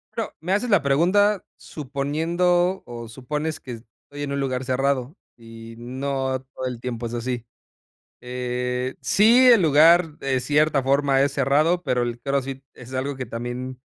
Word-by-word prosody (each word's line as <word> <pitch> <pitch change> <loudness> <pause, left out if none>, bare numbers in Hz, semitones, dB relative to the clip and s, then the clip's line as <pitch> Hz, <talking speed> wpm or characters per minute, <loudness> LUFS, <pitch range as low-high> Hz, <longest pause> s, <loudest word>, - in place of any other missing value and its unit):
Bueno, - - -3
me 175 +3 -3
haces 235 +5 0
la 200 -8 +4
pregunta 185 +8 +3
suponiendo, 165 +6 -1
o 120 -1 -8
supones 150 +7 -4
que 130 - -9
estoy 120 +5 -11
en 145 -1 -3
un 140 - -2
lugar 130 -2 -2
cerrado 135 +3 -1 0.2
y 115 0 -12
no 130 +2 -2
todo 130 - -4
el 125 -2 -5
tiempo 120 -1 -4
es 115 - -6
así. 120 0 -3 0.8
Eh, 125 +1 -3
sí, 235 +5 +5
el 240 -4 +7
lugar 160 0 +5
de 135 -2 -1
cierta 150 +2 +2
forma 135 0 +2
es 140 +1 +2
cerrado, 150 +6 +2
pero, 125 -7 0
el 120 0 -3
CrossFit 135 +1 -3
es 125 +1 -12
algo 135 +2 -2
que 130 -1 -6
también 120 +3 -5
135 Hz, 160 wpm, -23 LUFS, 125-155 Hz, 0.8 s, el